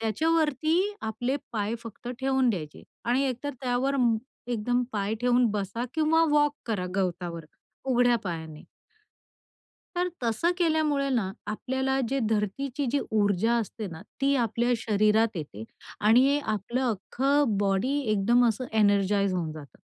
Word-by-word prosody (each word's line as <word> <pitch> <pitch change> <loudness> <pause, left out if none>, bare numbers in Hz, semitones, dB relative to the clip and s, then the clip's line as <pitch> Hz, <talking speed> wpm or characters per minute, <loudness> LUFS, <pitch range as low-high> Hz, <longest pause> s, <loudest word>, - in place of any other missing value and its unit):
त्याच्यावरती 310 - +1 0.2
आपले 245 +5 -2 0.2
पाय 215 0 -1
फक्त 230 +1 -9
ठेवून 265 -1 +2
द्यायचे 155 -8 -5 0.2
आणि 245 +3 +2
एकतर 260 +3 -4
त्यावर 260 +2 0 0.6
एकदम 245 +2 0
पाय 205 +1 -1
ठेवून 245 0 +3
बसा 205 +3 -3
किंवा 320 +1 +3
वॉक 295 -1 +3
करा 205 -6 -1
गवतावर 175 -3 -2 0.4
उघड्या 245 -2 +3
पायाने. 160 -4 -6 1.3
तर 355 +1 +1
तसं 235 +9 +1
केल्यामुळे 310 -5 +1
ना, 230 -8 0 0.2
आपल्याला 265 +5 -1
जे 275 - 0
धरतीची 250 +7 -1
जी 285 - +3
ऊर्जा 205 +1 +2
असते 220 -1 -3
ना, 165 -3 -8 0.2
ती 275 +1 +3
आपल्या 235 0 +1
शरीरात 215 0 +2
येते 140 -10 -6 0.4
आणि 255 +7 +5
आपलं 215 +4 -2
अख्खं 260 +3 +1
बॉडी 200 +7 +1 0.2
एकदम 230 +5 +3
असं 225 +3 -2
एनर्जाइज 200 -2 +3
होऊन 165 -3 -2
जातं. 150 -3 -12
230 Hz, 130 wpm, -27 LUFS, 200-270 Hz, 1.3 s, आणि